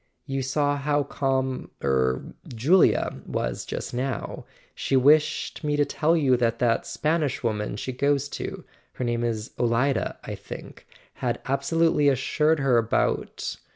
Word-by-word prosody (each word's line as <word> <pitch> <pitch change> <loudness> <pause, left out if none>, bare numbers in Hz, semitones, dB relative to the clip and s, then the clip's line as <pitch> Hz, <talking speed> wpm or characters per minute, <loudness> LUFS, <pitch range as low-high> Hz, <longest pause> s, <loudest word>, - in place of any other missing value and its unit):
You 135 -1 -2
saw 145 +2 +1
how 145 +1 +1
calm—er—Julia 130 - 0
was - - -2
just - - -5
now: 130 -1 -3 0.3
she 135 - -1
wished 150 +4 +3
me 150 -1 +1
to 145 0 +3
tell 160 +4 +1
you 135 -5 +4
that 115 -1 +1
that 115 -1 +1
Spanish 155 -4 -1
woman 105 -3 -1
she 120 +5 -4
goes 140 +2 +1
to—her 130 - -8
name 120 0 0
is 115 -2 -2
Olida, 125 +3 +1
I - - -5
think—had - - -7
abso¬ 140 +5 -1
lutely 165 -3 +4
reassured 150 +3 +2
her 130 -3 +4
about. 115 0 -1
135 Hz, 130 wpm, -25 LUFS, 120-145 Hz, 0.3 s, you